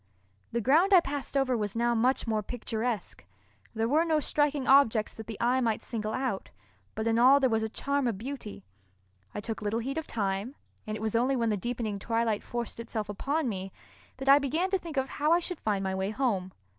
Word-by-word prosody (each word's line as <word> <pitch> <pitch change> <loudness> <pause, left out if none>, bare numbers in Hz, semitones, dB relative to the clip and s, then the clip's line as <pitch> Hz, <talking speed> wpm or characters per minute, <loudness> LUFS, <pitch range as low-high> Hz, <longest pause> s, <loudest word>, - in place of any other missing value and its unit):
The 235 - -1
ground 320 - +4
I - - +9
passed 285 -3 -3
over 265 -2 +2
was 210 -2 -2
now 235 +1 +2
much 245 +3 +2
more 220 -2 0
picturesque. 225 0 -4 0.5
There 225 +1 +1
were 305 +6 +3
no 320 -2 +2
striking 290 -2 0
objects 245 -6 +4
that 220 - -9
the 220 -3 -6
eye 250 +2 +2
might 225 -3 0
single 215 -2 -3
out, 255 -7 -2 0.5
but 220 - -2
in 230 0 +2
all 265 +4 +7
there 260 -3 +2
was 220 0 +2
a 220 - -2
charm 280 +3 -1
of 225 -5 -1
beauty. 225 -4 -7 0.7
I 205 - -3
took 225 +1 -5
little 210 +1 -1
heed 270 +6 -2
of 320 - -8
time, 200 +4 -2 0.3
and 215 0 -3
it - - -9
was 220 0 -1
only 255 +4 +2
when 230 -3 +1
the - - +1
deepening 220 0 -3
twilight 225 0 0
forced 240 -1 -5
itself 220 -2 -4
upon 280 +8 -1
me 195 -3 -4 0.5
that 270 +1 -7
I 275 +1 +8
began 315 +7 -1
to 385 - +2
think 330 -5 -8
of 265 0 +1
how 300 +4 +1
I 345 - +4
should 350 -1 -5
find 205 -2 -1
my 190 0 -1
way 190 +1 -1
home. 210 -6 -1
235 Hz, 220 wpm, -29 LUFS, 215-275 Hz, 0.7 s, I